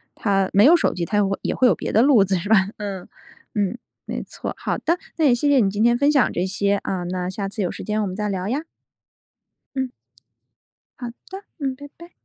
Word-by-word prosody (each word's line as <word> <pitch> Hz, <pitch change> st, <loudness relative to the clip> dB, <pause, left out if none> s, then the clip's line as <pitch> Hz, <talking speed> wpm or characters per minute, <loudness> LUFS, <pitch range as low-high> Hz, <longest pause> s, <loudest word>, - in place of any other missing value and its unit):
他 195 Hz, -2 st, +1 dB
没 205 Hz, +3 st, +6 dB
有 325 Hz, +5 st, +8 dB
手 340 Hz, -, +1 dB
机 170 Hz, -2 st, -2 dB
他 210 Hz, -, -1 dB
也 -, -, +4 dB, 0.2 s
也 -, -, -2 dB
会 255 Hz, -, +4 dB
有 -, -, +4 dB
别 -, -, -4 dB
的 220 Hz, -, +4 dB
路 255 Hz, -6 st, +6 dB
子 190 Hz, 0 st, 0 dB
是 195 Hz, +5 st, -5 dB
吧？ 195 Hz, -4 st, +5 dB
嗯， 200 Hz, -3 st, -5 dB, 0.5 s
嗯， 205 Hz, +3 st, 0 dB, 0.3 s
没 -, -, -4 dB
错。 -, -, -6 dB
好 -, -, -2 dB
的， 340 Hz, +2 st, 0 dB, 0.2 s
那 320 Hz, -, +2 dB
也 250 Hz, -4 st, +5 dB
谢 290 Hz, +4 st, 0 dB
谢 280 Hz, -2 st, +5 dB
你 200 Hz, -4 st, +3 dB
今 205 Hz, +3 st, -1 dB
天 240 Hz, 0 st, +4 dB
分 285 Hz, +3 st, +3 dB
享 280 Hz, -4 st, +3 dB
这 180 Hz, -, -1 dB
些， 200 Hz, +1 st, 0 dB
啊， 185 Hz, -2 st, -2 dB
那 180 Hz, 0 st, -3 dB
下 195 Hz, +1 st, -4 dB
次 210 Hz, +1 st, -4 dB
有 180 Hz, -, -1 dB
时 -, -, -8 dB
间 215 Hz, 0 st, -1 dB
我 205 Hz, -, -1 dB
们 185 Hz, -, -5 dB
再 210 Hz, +1 st, -2 dB
聊 190 Hz, -1 st, -3 dB
呀。 270 Hz, +7 st, -1 dB, 1.1 s
嗯。 260 Hz, -1 st, -1 dB, 1.1 s
好 245 Hz, -, -5 dB, 0.2 s
的， 385 Hz, +2 st, -8 dB, 0.2 s
嗯， 270 Hz, -2 st, -2 dB
拜 285 Hz, +2 st, -10 dB
拜。 340 Hz, +1 st, -14 dB
210 Hz, 250 characters per minute, -22 LUFS, 195-265 Hz, 1.1 s, 有